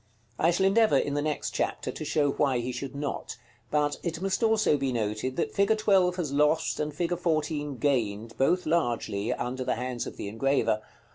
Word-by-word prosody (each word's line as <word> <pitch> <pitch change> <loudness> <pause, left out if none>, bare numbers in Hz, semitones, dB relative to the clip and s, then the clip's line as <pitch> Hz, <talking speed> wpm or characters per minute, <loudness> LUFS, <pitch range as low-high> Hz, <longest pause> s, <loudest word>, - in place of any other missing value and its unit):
I 165 - +4
shall 175 +3 +2
endeavor, 215 +3 +4
in 145 - 0
the 145 - 0
next 150 -1 -2
chapter, - - -2
to - - -7
show 145 -2 +1
why 135 -3 +1
he 120 +1 -2
should 130 +2 -6
not; 145 -2 -4 0.3
but 150 -1 +1
it 170 -2 -3
must 195 +3 -1
also 220 -7 +3
be 135 -2 -1
noted, 110 +2 -2
that 170 - -1
fig. 200 +2 +3
12 195 -4 +3
has 170 -6 -3
lost, 150 +3 +2
and 150 0 -1
fig. 170 +4 -1
14 155 -4 -1
gained, 115 -5 -1
both 170 +9 +2
largely, 120 -10 0
under 130 +2 -3
the - - 0
hands 125 -1 -3
of - - -8
the - - -5
engraver. 115 0 +1
145 Hz, 195 wpm, -28 LUFS, 125-170 Hz, 0.3 s, I